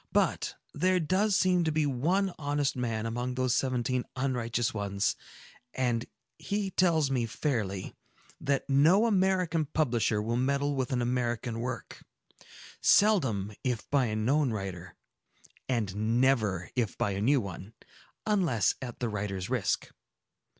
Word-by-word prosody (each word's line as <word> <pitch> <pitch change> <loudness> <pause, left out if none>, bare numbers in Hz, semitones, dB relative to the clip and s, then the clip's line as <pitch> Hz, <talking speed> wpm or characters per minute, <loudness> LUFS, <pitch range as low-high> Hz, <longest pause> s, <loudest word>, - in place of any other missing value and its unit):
"But, - - +1 0.2
there 185 0 +2
does 190 +5 +1
seem 180 -2 +3
to 160 - +1
be 155 0 +1
one 175 +9 +1
honest 145 -1 0
man 115 -3 -2
among 120 +2 -3
these 130 -1 +1
seventeen 125 -1 0
unrighteous 125 -2 -1
ones; 100 -1 -1 0.6
and 120 -2 0 0.3
he 200 -1 -2
tells 160 -7 +2
me 120 -3 0
fairly, 110 -8 -2 0.5
that 140 -1 -1
no 160 +10 +5
American 185 -6 +2
publisher 120 -8 +1
will 115 +3 -1
meddle 140 +3 +1
with 130 -1 -2
an 125 -2 0
American 120 -1 -1
work,—seldom 125 - -1
if 125 -4 -2
by 140 -3 +3
a 105 - -2
known 135 +6 +2
writer, 95 -4 -6 0.7
and 110 -1 0
never 110 -9 +1
if 120 -6 -1
by 100 - 0
a 100 +1 -3
new 135 +6 +4
one,—unless 115 - -2
at 120 -3 -6
the 120 - 0
writer's 100 -3 -4
risk." - - 0
125 Hz, 130 wpm, -29 LUFS, 110-150 Hz, 0.7 s, no